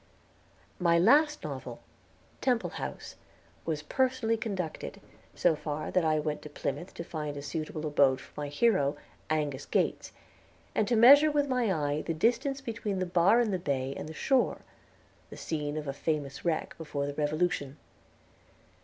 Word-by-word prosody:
My 170 -2 +4
last 295 - +4
novel, - - -6 0.6
"Temple 250 -3 +1
House," - - -6 0.5
was 155 -2 -2
personally 255 - +1
conducted, 195 -7 -4 0.4
so 160 - +3
far 150 0 -4
that 180 - +2
I 155 -1 +2
went 150 0 -2
to 150 - -9
Plymouth 175 +4 -4
to 170 - -5
find 150 -3 -5
a - - -5
suitable 155 0 -4
abode 140 -3 +3
for - - -14
my 145 - -3
hero, 145 -3 +2 0.3
Angus 150 -3 -1
Gates, - - 0 0.6
and 215 - +1
to 240 - +2
measure 280 +7 +8
with 290 -1 +1
my 250 -5 +1
eye 150 -3 0
the 165 - -3
distance 245 - +1
between 225 -5 -3
the 185 - 0
bar 180 +6 +4
in 235 -3 +2
the 185 - -1
bay 135 -4 -2
and - - -6
the - - -7
shore, 265 - +1 0.7
the - - -10
scene 150 -2 -3
of 150 -1 -4
a 135 - -2
famous 140 -2 -3
wreck 170 -2 -1
before 150 -3 -3
the 145 - -4
Revolution. 150 -1 -1
165 Hz, 160 wpm, -30 LUFS, 150-230 Hz, 0.7 s, measure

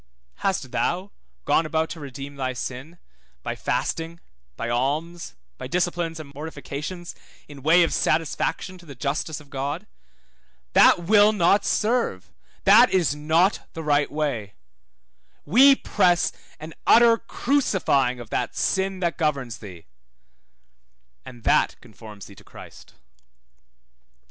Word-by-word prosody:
Hast 165 -10 -2
thou 185 +3 -1 0.3
gone - - +3
about 160 0 -1
to 165 - -7
redeem 140 0 -8
thy 130 -2 -3
sin, 130 +7 -7 0.5
by - - -3
fasting, 165 +1 -3 0.4
by 115 - -3
alms, 150 +8 -2 0.2
by - - -6
disciplines 175 -2 -1
and 140 -2 -10
mortifications, 150 +3 -7 0.3
in 145 -2 -12
way 165 +5 +5
of 165 - 0
satisfaction 165 +3 -1
to 170 - -17
the 140 - -10
justice 145 +4 -3
of 145 -2 -18
God? 145 +8 -4 0.9
That 175 - +6
will 205 +3 +5
not 200 +1 +3
serve 220 - 0 0.3
that - - +7
is 175 -6 +1
not 160 +6 +1
the 165 - -6
right 145 -1 +1
way; 140 -9 -3 0.9
we 265 - +7
press 180 -8 +1 0.3
an 155 +1 -9
utter 230 0 +6
crucifying 190 - 0
of 120 -2 -11
that - - -2
sin 190 0 -1
that 170 -1 -1
governs 140 - -1
thee: 90 -5 -11 1.4
and 120 -3 -12
that - - +2
conforms 105 -2 -13
thee 100 - -13
to - - -17
Christ. - - -14
160 Hz, 130 wpm, -24 LUFS, 140-180 Hz, 1.4 s, that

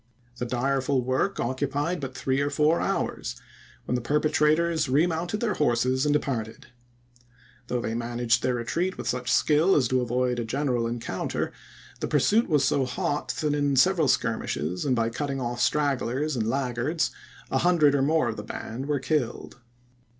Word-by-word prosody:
The 125 - -2
direful 130 +1 0
work 130 +10 0
occupied 145 +7 -1
but 135 -2 -6
three 135 +1 0
or 145 - 0
four 150 +3 +2
hours, - - -2 0.5
when - - -2
the 125 - 0
perpetrators 155 +3 +2
re 145 +6 +4
mounted 175 +4 -2
their 225 -4 +1
horses 130 -1 +1
and 145 - +3
departed. 120 -7 -2 1.0
Though 125 -1 -1
they 110 - -3
managed 120 0 0
their 125 - 0
retreat 170 +11 -2
with - - -5
such 125 0 -1
skill 160 +5 +4
as 130 -5 +3
to 130 0 +2
avoid 125 0 0
a - - -1
general 125 -1 -1
encounter, 120 0 -3 0.5
the - - -2
pur - - +2
suit 225 +1 +3
was 150 -4 +3
so 135 - +2
hot 145 +3 -2
that 150 -1 +1
in 145 -1 +1
several 165 +2 +4
skirmishes, 90 - -1
and 130 -3 +2
by 115 -1 0
cutting 140 +2 -3
off 120 -1 -3
stragglers 145 0 0
and 110 -2 -1
laggards, 135 +4 -1 0.4
a - - +2
hundred 170 -5 +4
or 140 - +2
more 155 0 +2
of 110 - -4
the 105 - -5
band 120 +5 -6
were 150 -1 +1
killed. 130 -5 -2
135 Hz, 170 wpm, -26 LUFS, 120-150 Hz, 1.0 s, re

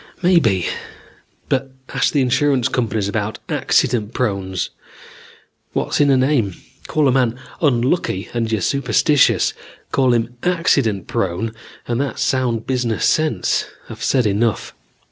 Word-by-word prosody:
Maybe; 120 - +3 0.8
but 135 0 0 0.2
ask - - +1
the 145 - +2
insurance 130 0 +2
companies 110 -4 -1
about 105 +1 -2
accident 110 -2 +1
prones. 95 -6 -2 1.0
What's - - 0
in 145 - +4
a 135 - +5
name? 130 -8 +1 0.3
Call 155 -2 +2
a - - +4
man 125 -2 +1 0.2
unlucky 125 - +1
and 115 -2 -1
you're 110 -3 0
superstitious. 140 - +2 0.4
Call 130 -2 +3
him 120 +1 -1
accident 140 - +1
prone 95 +5 -2 0.3
and 120 +2 0
that's 140 -5 -2
sound 125 -4 0
business 125 -4 0
sense. 155 -12 +1 0.2
I've - - -8
said 125 -3 +2
enough. 105 +2 0
120 Hz, 125 wpm, -19 LUFS, 110-135 Hz, 1.0 s, a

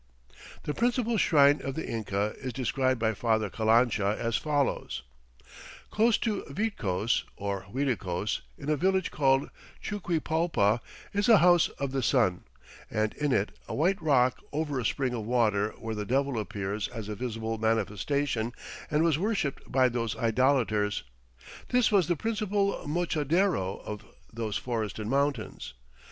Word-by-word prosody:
The 150 - -2
principal 235 - +1
shrine 145 -6 +5
of 135 -1 -4
the 160 - -4
Inca 105 -2 -2
is 130 -2 -5
described 130 0 0
by 110 -1 +1
Father 110 -2 0
Calancha 110 -1 +2
as 115 -1 -1
follows: 145 +1 -1 0.9
"Close 225 +1 +3
to 215 -4 -1
Vitcos 120 - 0
[or 100 -1 -3
Uiticos] 110 -8 -1 0.2
in 140 - -9
a 155 - +3
village 190 +4 +1
called 135 -2 +2 0.3
Chuquipalpa, 165 - 0 0.3
is 205 +2 +1
a 225 - +9
House 175 -2 +5
of 140 -1 -2
the 135 0 -1
Sun, 110 -6 +2 0.4
and 110 0 0
in 145 -1 -1
it 100 -4 +1 0.2
a - - -4
white 185 +7 +1
rock 130 -5 +3
over 145 -2 -1
a 120 - -3
spring 130 +1 0
of 115 -3 -3
water 110 -4 +2
where 115 0 -5
the 105 -1 -3
Devil 135 +2 0
appears 100 -1 -3
as 115 -4 -7
a 105 - -3
visible 115 0 -4
manifestation 115 +3 0 0.4
and 150 +1 +2
was 160 -3 +2
worshipped 195 -8 -2
by 130 0 +4
those 115 -3 -2
idolators. 115 -4 +1 0.7
This 250 -3 +3
was 195 -6 +4
the 175 - +2
principal 205 -2 -1
mochadero 155 - 0
of 105 0 -6 0.3
those 110 -2 -2
forested 110 -3 -3
mountains. 135 - -1
130 Hz, 145 wpm, -28 LUFS, 110-160 Hz, 0.9 s, a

